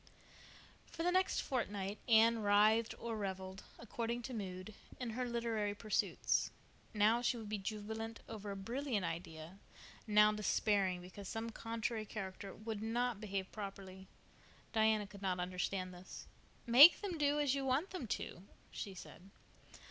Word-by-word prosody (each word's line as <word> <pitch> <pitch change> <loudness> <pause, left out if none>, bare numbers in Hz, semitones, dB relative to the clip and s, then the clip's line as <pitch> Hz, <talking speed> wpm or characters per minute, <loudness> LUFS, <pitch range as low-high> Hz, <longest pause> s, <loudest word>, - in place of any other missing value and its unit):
For 330 - -5
the 355 - +3
next 370 +1 +2
fortnight 205 -6 -2
Anne 230 0 +6
writhed 215 +2 +4
or 230 -1 -4
reveled, 190 -2 -4 0.2
according 235 +1 -3
to 255 - -5
mood, 190 -1 -5 0.3
in 245 -3 -3
her 250 +3 -2
literary 225 -3 -1
pursuits. 215 -1 +1 0.4
Now 220 +2 +3
she 245 0 +1
would 220 -2 -7
be 210 -1 -2
jubilant 220 +3 -5
over 210 -2 -6
a 200 - -3
brilliant 230 0 -2
idea, 165 +2 -6 0.5
now 210 0 +6
despairing 200 -3 +1
because 185 +2 -9
some 225 +1 -4
contrary 225 -1 -3
character 195 -1 -6
would 215 0 -5
not 230 0 -1
behave 195 -2 -3
properly. 195 -2 -8 0.7
Diana 220 -1 +3
could 200 0 -12
not 185 -2 0
understand 185 +1 -2
this. 180 +1 -10 0.4
"Make 265 +8 +9
them 370 -6 -3
do 290 0 +3
as 290 -3 +2
you 275 -1 -1
want 270 +8 +1
them 360 -11 -5
to," 180 - -4 0.3
she 195 -2 -6
said. 185 +1 -11
215 Hz, 150 wpm, -37 LUFS, 195-235 Hz, 0.7 s, Make